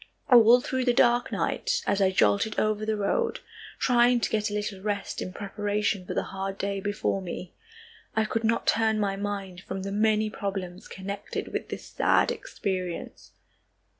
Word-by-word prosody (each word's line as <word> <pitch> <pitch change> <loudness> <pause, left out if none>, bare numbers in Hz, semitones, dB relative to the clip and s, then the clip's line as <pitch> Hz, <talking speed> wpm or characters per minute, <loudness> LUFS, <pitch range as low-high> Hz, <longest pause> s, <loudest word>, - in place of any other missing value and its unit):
All 240 0 +8
through 260 0 -1
the 245 -1 +3
dark 240 0 +3
night, - - -1
as 200 - +1
I 190 - +5
jolted 185 - +2
over 215 0 0
the 220 -1 0
road, 450 - 0 0.4
trying 245 -1 +4
to - - 0
get 215 0 +1
a - - -6
little 205 -2 -3
rest 205 -1 -3
in 185 - -4
preparation 205 0 -2
for - - -4
the - - +1
hard 195 0 -5
day 200 0 -2
before 200 0 -1
me, 180 0 -6 0.6
I 220 0 +2
could 225 +1 -2
not 230 +1 +1
turn 220 -1 +2
my 200 -2 0
mind 195 -3 -4
from 190 0 -5
the 195 - -4
many 215 +1 +2
problems 190 -3 -5
connected 200 +1 -6
with - - -3
this - - -6
sad - - +2
experience. 185 -3 -5
205 Hz, 170 wpm, -27 LUFS, 195-220 Hz, 0.6 s, All